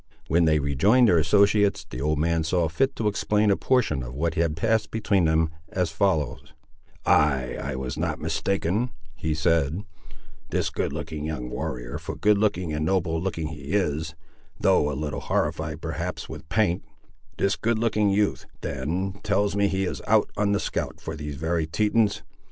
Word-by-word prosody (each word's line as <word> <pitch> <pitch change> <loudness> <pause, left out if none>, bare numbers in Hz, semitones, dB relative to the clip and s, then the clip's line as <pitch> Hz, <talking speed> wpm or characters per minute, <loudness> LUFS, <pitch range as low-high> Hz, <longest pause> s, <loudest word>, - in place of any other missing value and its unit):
When 85 +1 +4
they 80 -1 +4
rejoined 85 - +4
their 85 -5 +5
associates, 100 +4 +3
the - - -6
old 75 +1 +1
man 80 +1 +1
saw 85 +1 +1
fit 130 - 0
to 110 - -1
explain 105 0 +2
a - - +4
portion 125 - +1
of 65 +1 -7
what 80 +3 0
had 80 -2 0
passed 110 +4 +1
between 100 -5 +1
them, 80 0 +2 0.2
as 90 -3 -1
follows— 75 -5 0 0.5
"Ay, 65 -4 +3
I 70 0 -3
was 65 0 -4
not - - -1
mistaken," 100 +5 0 0.2
he 80 -1 -2
said; 80 +3 +1 0.7
"this - - 0
good - - -2
looking 75 -2 -5
young 65 -6 -4
warrior—for - - -4
good 105 -1 +3
looking 95 -6 0
and 75 0 -1
noble 85 -2 0
looking 85 -4 -2
he 75 +1 -7
is, 80 -5 0 0.4
though 75 - +3
a 70 - -4
little 75 -1 -3
horrified 80 0 -2
perhaps 85 +2 -4
with 80 - -9
paint—this 90 0 -2
good 115 0 0
looking 105 -2 +2
youth, 100 +1 +1
then, 90 +9 -3
tells 100 0 +1
me 100 0 +3
he 95 0 0
is - - -4
out 110 -1 +3
on 105 0 +1
the 100 - +2
scout - - -3
for 80 - -6
these 75 -1 -5
very 80 +2 -1
Tetons. 105 +4 +1
85 Hz, 170 wpm, -25 LUFS, 75-100 Hz, 0.7 s, their